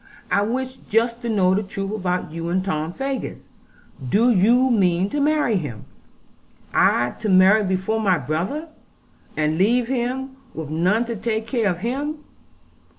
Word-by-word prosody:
I 200 +2 +3
wish 260 +4 -2
just 230 +2 0
to 240 - -3
know 190 -4 +3
the 200 - +1
truth 195 0 -5
about 180 -6 -2
you 165 +1 -4
and 185 +2 0
Tom 155 -3 -2
Faggus. 270 +6 -4 0.6
Do 235 - +4
you 240 +6 +4
mean 190 -3 +2
to 295 - -1
marry 295 -6 +2
him?' 130 - -6 0.9
'I 120 +1 +3
to 215 - -2
marry 190 +3 +6
before 190 +3 -1
my 190 -4 +3
brother, 175 - -3 0.7
and 155 +1 0
leave 235 +5 +2
him 265 +1 -2 0.2
with 155 -2 -6
none 185 +9 +2
to 235 0 -4
take 220 +1 -2
care 225 -2 0
of 175 - -1
him! 285 +5 -2
210 Hz, 155 wpm, -22 LUFS, 180-240 Hz, 0.9 s, marry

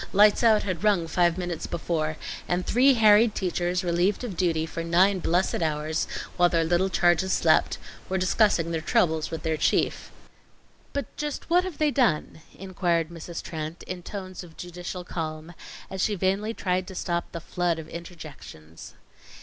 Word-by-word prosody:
"Lights 205 +1 +5
out" 220 -3 +4
had 185 -3 -3
rung 200 -5 +3
five 175 +1 +2
minutes 175 -3 -4
before, 160 -2 -2 0.3
and 180 +1 -1
three 260 +3 +4
harried 215 0 +5
teachers, 180 -1 -1
relieved 175 +5 +1
of 220 -7 -5
duty 165 -3 +1
for 165 +1 -5
nine 185 +4 +3
blessed 175 +1 0
hours 155 0 -1 0.3
while 175 0 +5
their 165 -1 +2
little 175 +3 +1
charges 175 0 +2
slept, - - +3 0.3
were 190 - 0
discussing 185 -2 +2
their 165 -1 -2
troubles 160 0 +1
with 160 - -6
their 160 -1 0
chief. - - 0 0.8
"But 280 -4 -5
just 300 +2 -5
what 355 +1 +5
have 360 -6 -6
they 305 -1 +2
done?" 225 - +1 0.2
inquired 175 -4 -1
Mrs. 170 0 -7
Trent, 160 0 -6
in 180 -1 -6
tones 185 0 -7
of 165 -2 -15
judicial 180 +1 -6
calm, 160 -1 -5 0.3
as 190 -1 -5
she 210 - +1
vainly 195 +4 -1
tried 185 -1 -1
to 190 - -9
stop 170 -1 -2
the 170 - -5
flood 175 0 -1
of 160 -1 -8
interjections. 155 - -11
175 Hz, 165 wpm, -26 LUFS, 165-195 Hz, 0.8 s, Lights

